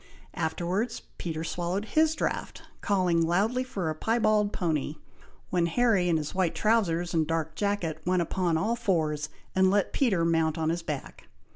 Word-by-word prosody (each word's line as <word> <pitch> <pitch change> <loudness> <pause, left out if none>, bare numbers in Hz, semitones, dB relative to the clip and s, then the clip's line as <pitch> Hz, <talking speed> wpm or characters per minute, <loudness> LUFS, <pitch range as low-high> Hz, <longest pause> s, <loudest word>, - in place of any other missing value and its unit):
Afterwards 175 +7 -2 0.2
Peter 160 -2 -3
swallowed 175 +5 -2
his 315 +6 +2
draught, - - -3 0.2
calling 180 -4 +2
loudly 200 +10 +1
for 200 -9 -4
a 155 - 0
piebald 215 +3 +2
pony, 155 -5 -1 0.6
when 175 -2 +2
Harry 200 -2 +2
in 165 - +3
his 150 -1 -4
white 185 -3 0
trowsers, 175 -6 +1
and 160 -2 +2
dark 160 -1 -1
jacket, 190 -7 -1
went 180 +1 +2
upon 170 -1 0
all 220 +8 0
fours, 160 -10 0 0.3
and 190 0 +5
let 200 +1 +1
Peter 195 -11 +2
mount 160 -1 +1
on 160 -1 0
his 170 +1 -2
back. 150 -4 -6
175 Hz, 160 wpm, -28 LUFS, 160-205 Hz, 0.6 s, and